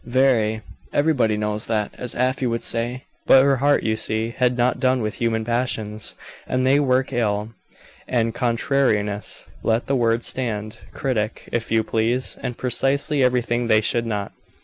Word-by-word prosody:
Very. 120 -4 +2 0.3
Everybody 140 -8 +2
knows 105 0 -2
that, 105 -2 -1
as 125 - -6
Afy 130 +1 0
would 115 0 -2
say. 120 +3 -2 0.2
But 130 - +7
her 140 -1 +3
heart, 145 +3 +2
you 110 -1 +1
see, 110 +1 -1
had 125 0 0
not 125 +1 +1
done 130 -2 +2
with 105 - -2
human 115 -1 0
passions, 110 -3 -2 0.3
and 130 0 0
they 135 +2 +4
work 130 -1 +1
ill, 105 -3 0 0.6
and 115 -2 0
contrariness, 115 -4 0 0.2
let 115 +1 0
the 140 - 0
word 115 -1 +1
stand, 110 -4 -1
critic, 110 -5 -3
if 115 -1 -2
you 110 -1 +2
please, 115 +4 0
and 125 - -4
precisely 135 +3 +1
everything 120 -1 +1
they 110 -1 +4
should 115 +2 0
not. 105 -3 -3
120 Hz, 160 wpm, -22 LUFS, 110-130 Hz, 0.6 s, But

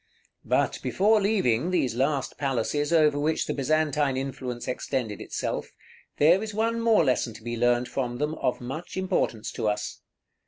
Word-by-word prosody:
§ - - -44 0.4
XXXVII. - - -19
But - - +1
before 210 +2 +3
leaving 180 - +2
these 135 -10 +1
last 135 +2 0
palaces 140 +3 0
over 155 -3 +4
which 155 +2 0
the - - -2
Byzantine 145 -1 +1
influence 130 -2 -4
extended 125 -4 -3
itself, - - -4 0.4
there 170 +6 +5
is 215 -1 -5
one 230 +1 0
more 225 -7 +4
lesson 125 -4 0
to 110 - -12
be 120 0 -3
learned 120 +1 +2
from 120 -3 -3
them 150 +3 -1
of 125 - 0
much 155 +10 -6
importance 180 - -1
to 110 - -2
us. 105 0 -2
140 Hz, 170 wpm, -26 LUFS, 120-165 Hz, 0.4 s, there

